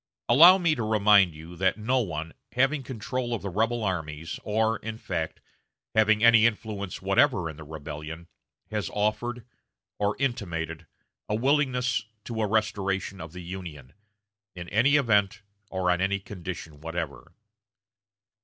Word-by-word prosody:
Allow 170 - +9
me 170 -4 +2
to 130 - -3
remind 105 -5 +4
you 80 +3 -10
that 95 +3 +2
no 125 +5 +1
one, 80 -7 -4 0.2
having 135 +4 +2
control 125 0 -3
of 110 - -7
the 100 - -3
rebel 115 +4 0
armies, 80 -4 -3
or, 110 +1 +1
in 110 +1 -6
fact, 80 -7 -4 0.5
having 110 0 +3
any 115 -1 +7
influence 105 -4 -4
whatever 85 - +3
in 80 - -6
the 80 - -10
rebellion, 75 +2 -8 0.4
has 105 -5 -2
offered, 110 +3 -1 0.5
or 100 0 +1
intimated, 85 - -3 0.4
a 105 - +1
willingness 125 -3 +1 0.2
to 115 -2 -4
a 105 - +1
restoration 100 -3 -1
of 80 -1 -8
the 90 +1 -9
Union, 85 -7 -8 0.6
in 85 -1 -7
any 125 +7 +4
event, 105 -7 +2 0.3
or 95 -1 0
on 90 0 0
any 100 +1 +1
condition 90 -6 -8
whatever.... 80 -2 -5
100 Hz, 145 wpm, -27 LUFS, 85-115 Hz, 0.6 s, Allow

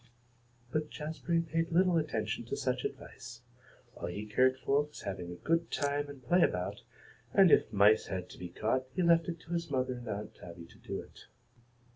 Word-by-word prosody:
But 155 +1 -1
Jazbury 160 +2 -1
paid 165 +1 -1
little 180 +1 +4
attention 155 -2 -1
to - - -3
such - - -1
advice. 120 -2 -7 0.5
All - - -5
he 100 +5 -5
cared 130 +5 +3
for 140 +2 +2
was 150 - -12
having 95 -3 -5
a - - -6
good 165 +1 +2
time 145 0 -1
and 135 -3 -11
play 175 +8 +4
about, 90 - 0 0.5
and 190 -4 +7
if - - +5
mice 105 +1 +5
had 90 -1 -4
to - - -12
be 90 - -6
caught 115 +8 0
he 185 - +1
left 170 -1 +4
it 170 -1 -4
to 170 - -7
his 170 -1 -2
mother 130 -2 0
and 120 -1 -8
Aunt 105 +1 -4
Tabby 85 -1 -11
to - - -18
do - - -5
it. - - -13
140 Hz, 195 wpm, -32 LUFS, 105-165 Hz, 0.5 s, and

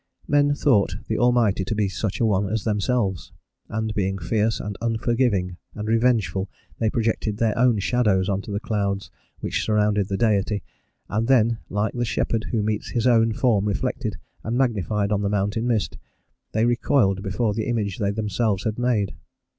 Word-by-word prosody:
Men 145 0 +3
thought 105 -10 +2
the - - -1
Almighty 120 -5 +3
to 95 +4 -3
be 105 -1 +1
such 95 +1 -3
a 115 - +3
one 100 -2 +1
as 110 -1 -1
themselves, 105 -3 -1 0.4
and 110 0 -2
being 95 -2 -1
fierce 110 +2 0
and 105 -1 -5
unforgiving 115 -5 0 0.2
and 105 0 -5
revengeful, 110 -4 +1 0.3
they 110 - +2
projected 110 -2 -1
their 110 -2 +1
own 120 -2 +3
shadows 100 -3 +2
on 100 0 0
to 105 - -8
the 100 - -1
clouds 100 -2 -2 0.3
which - - -1
surrounded 105 -2 +2
the 95 - -2
Deity, 105 -2 +1 0.4
and 110 +2 -1
then, 115 -3 +3
like 105 +2 -1
the 120 - -1
shepherd 115 -1 -1
who 110 -3 -1
meets 105 0 -2
his 120 -1 -1
own 115 -2 +4
form 110 -4 +2
reflected 100 -3 -2 0.3
and 115 +3 -2
magnified 105 -5 0
on 105 -1 +1
the 100 - 0
mountain 105 +3 0
mist, 115 -4 -1 0.5
they 110 +1 +2
recoiled 120 -5 +2
before 105 +2 -1
the 110 +1 -2
image 105 -5 -1
they 100 -2 +1
themselves 105 -1 -1
had 110 +1 -2
made. 115 -5 +1
110 Hz, 175 wpm, -23 LUFS, 100-115 Hz, 0.5 s, own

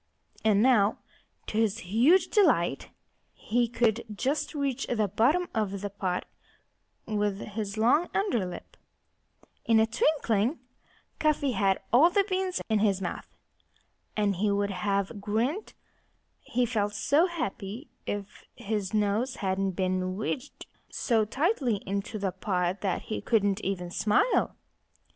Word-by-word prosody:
And 215 -1 +4
now, 225 -5 +4 0.5
to 215 - -2
his 220 -1 +1
huge 240 - +3
delight, 175 - +2 0.5
he 240 +2 0
could 230 -1 +1
just 270 +9 -2
reach 275 -2 -1
the 220 -4 +1
bottom 265 - +2
of 200 -3 -1
the 205 -1 -4
pot 185 -3 -2 0.8
with 205 -2 -1
his 210 0 -5
long 250 +10 +3
under 390 - +1
lip. 180 -1 -8 0.9
In 225 -1 +4
a 220 - +5
twinkling 235 0 +1 0.6
Cuffy 295 -3 +2
had 195 -3 +1
all 295 +8 +7
the 395 +2 +2
beans 375 -1 -1
in 220 -2 +2
his 200 -2 +2
mouth. 185 - -5 0.9
And 205 -3 +1
he 210 +3 +1
would 200 0 0
have 200 +2 -1
grinned 235 - -1 0.7
he 250 +1 0
felt 210 -3 -1
so 290 - +3
happy 235 - -5 0.2
if 205 0 -5
his 210 -3 -3
nose 215 +5 +1
hadn't 190 0 -1
been 185 0 -1
wedged 255 +6 -4 0.2
so 225 -3 +1
tightly 270 - +1
into 200 +2 -3
the 195 -2 -1
pot 185 -1 -1
that 190 -3 -1
he 215 - -4
couldn't 205 -3 +1
even 180 -2 -3
smile. 210 - +2
215 Hz, 135 wpm, -28 LUFS, 200-250 Hz, 0.9 s, all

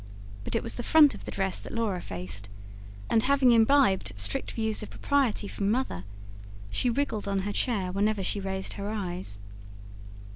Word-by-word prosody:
But - - -3
it - - 0
was - - -2
the - - -4
front 295 +3 +6
of - - -10
the - - -5
dress 195 -1 -1
that - - -9
Laura 215 -6 -1
faced; 95 +2 -6 0.6
and, 225 - +3
having 270 0 +4
imbibed 225 - +4
strict 100 0 0
views 220 -1 -1
of 215 - -6
propriety 265 -7 0
from 200 0 -2
Mother, 220 - -1 0.7
she 250 - +1
wriggled 235 -5 -1
on 195 -1 0
her 205 +1 -3
chair 200 -6 0
whenever 200 +1 0
she 200 - -1
raised 190 0 -3
her 200 0 -5
eyes. 180 - -4
205 Hz, 175 wpm, -28 LUFS, 190-235 Hz, 0.7 s, front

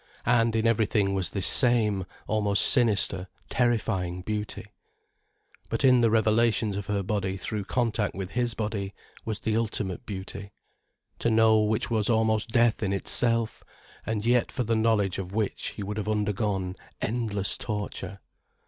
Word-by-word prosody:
And 115 -2 +3
in 110 0 +1
everything, 105 -3 +2
was 95 -2 -1
this 100 - -1
same, 110 -7 +4 0.2
almost 105 -2 +1
sinister, 100 -6 +2 0.2
terrifying 105 -7 0
beauty. 105 +1 -4 1.0
But - - 0
in 125 -2 +6
the 115 - +4
revelations 110 -1 +2
of 100 -1 -5
her 100 -1 -1
body 95 -1 -2
through 100 +2 -4
contact 115 -2 -1
with 95 -1 -5
his 120 -1 0
body, 105 -3 -3 0.3
was 110 -2 -2
the 110 - 0
ultimate 105 -5 -2
beauty, 100 0 -7 0.7
to - - +1
know 110 -1 +5
which 110 +2 0
was 110 -1 +1
almost 110 -1 +2
death 115 0 +3
in 100 -2 0
itself, 115 +3 +1 0.4
and 110 -1 -3
yet 120 0 +2
for 125 - -2
the 115 0 0
knowledge 110 -4 +1
of 95 0 -6
which 110 -2 -1
he 105 - -4
would 105 +2 -4
have 105 0 -3
undergone 105 -3 -1 0.2
endless 105 -4 -1
torture. 100 -2 -5
105 Hz, 150 wpm, -27 LUFS, 100-115 Hz, 1.0 s, in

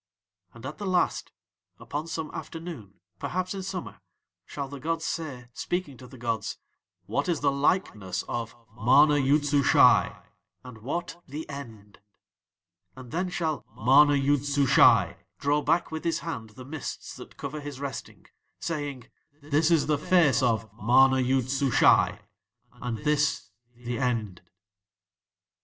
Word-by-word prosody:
"'And 115 +2 -11
at 140 +7 -7
the 205 - -4
Last, 180 -1 0 0.5
upon 145 +8 -5
some 160 -1 -4
afternoon, 155 - -8 0.2
perhaps 185 +1 -2
in 195 - -5
summer, 190 -1 -6 0.5
shall 140 -1 -5
the 140 +1 -8
gods 165 +3 -2
say, 140 -8 -4
speaking 175 -6 -3
to 125 - -12
the 130 +1 -13
gods: 115 -2 -3 0.5
"What - - -1
is 170 - 0
the 140 -1 +3
likeness 110 - 0
of 115 -1 -5 0.2
MANA 135 +6 +5
YOOD 145 +2 +2
SUSHAI 145 -1 +4 0.4
and 125 -3 -11
what 170 +8 -4
THE 150 +4 -6
END?" 115 -8 -10 1.0
"'And 125 -2 -11
then 180 +2 -1
shall 160 -5 -2
MANA 145 +5 +5
YOOD 140 0 +2
SUSHAI 140 -2 +4 0.2
draw 145 +1 +1
back 165 +4 +1
with 160 0 -5
his 165 -1 -1
hand 115 -10 -5
the 130 - -10
mists 145 +1 -6
that - - -12
cover 145 +2 -5
his 145 -2 -7
resting, 140 -1 -7 0.3
saying: 145 -6 -4 0.3
"This 150 +2 +1
is 165 -4 +3
the 150 -1 +1
Face 150 -6 +3
of 115 -4 +1
MANA 130 +4 +5
YOOD 130 0 +1
SUSHAI 135 -2 +3 0.5
and 120 -2 -5
this 150 -8 +1 0.2
THE 120 +1 -5
END."'" 115 -8 -2
140 Hz, 140 wpm, -27 LUFS, 125-155 Hz, 1.0 s, MANA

